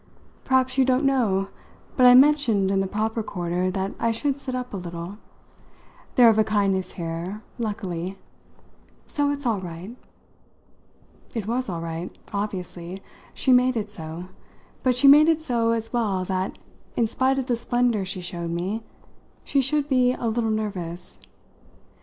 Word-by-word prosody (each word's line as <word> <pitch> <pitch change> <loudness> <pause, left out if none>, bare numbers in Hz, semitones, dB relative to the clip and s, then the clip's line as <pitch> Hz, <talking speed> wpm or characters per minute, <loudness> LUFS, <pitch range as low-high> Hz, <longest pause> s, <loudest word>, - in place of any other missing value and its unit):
"Perhaps 260 0 +2
you - - +7
don't 260 +2 +2
know 210 -8 +2 0.5
but 255 -1 +6
I 245 - +9
mentioned 255 -8 +4
in 195 - +2
the 195 - 0
proper 220 +3 -1
quarter 180 -2 -2
that 190 +1 -2
I 230 - +1
should 275 +5 -1
sit 260 -2 -4
up 250 -2 -5
a - - -2
little. 175 +2 -7 1.0
They're 245 -2 +7
of 220 -1 +3
a - - +6
kindness 195 -3 0
here, 170 +5 -5 0.2
luckily! 195 -5 -3 0.9
So 290 -1 0
it's 285 -1 -3
all 225 -4 +1
right." 180 +5 -8 1.4
It 220 -4 -2
was 245 +2 -1
all 170 -2 -3
right, 165 +1 -4 0.2
obviously 185 -3 -4 0.4
she 265 - +1
made 250 0 +4
it 210 -1 -3
so; 165 -1 -7 0.6
but 255 -1 +2
she 275 +3 +4
made 300 +3 +8
it 320 -1 +2
so 235 -5 +1
as 225 0 -1
well 200 -6 0
that, 185 0 -2 0.4
in 235 - +2
spite 260 +4 +1
of 265 - -1
the 245 - +1
splendour 240 -3 +1
she 190 -1 -5
showed 170 -1 -4
me, 180 +6 -2 0.6
she 280 - +1
should 285 +2 +1
be 255 -3 +3
a 245 - -5
little 225 0 0
nervous. 185 -5 -4
215 Hz, 160 wpm, -24 LUFS, 185-250 Hz, 1.4 s, I